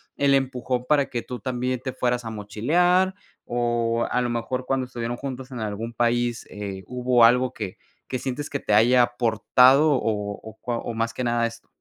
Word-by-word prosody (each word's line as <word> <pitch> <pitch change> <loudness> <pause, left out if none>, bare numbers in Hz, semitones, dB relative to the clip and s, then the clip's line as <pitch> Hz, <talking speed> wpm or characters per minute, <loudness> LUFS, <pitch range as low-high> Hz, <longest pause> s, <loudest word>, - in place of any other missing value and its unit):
el 140 -1 +3
empujón 130 -2 0
para 145 -2 +3
que 120 -2 -3
tú 125 -1 -7
también 125 -1 -2
te 130 - -3
fueras 125 -1 -1
a - - -4
mochilear? 165 - +1 0.3
O 120 -1 0
a 125 - +1
lo 120 - -1
mejor, 125 +2 -3
cuando 130 0 0
estuvieron 120 -1 -4
juntos 130 -1 -6
en 125 - -6
algún 110 +1 -4
país, 120 0 0
eh, 100 -2 -6
¿hubo 125 -1 +3
algo 125 +2 +4
que 105 -6 -6 0.3
que 130 - -3
sientes 135 +3 -4
que 140 - -3
te 105 - -1
haya 120 +4 +6
aportado 125 +4 +4
o 105 -5 -1
o, 110 0 -11
cua 120 -1 -3
o 120 - -5
más 115 0 -1
que 125 - -4
nada 120 0 +1
esto? 115 0 -12
120 Hz, 195 wpm, -24 LUFS, 115-130 Hz, 0.3 s, haya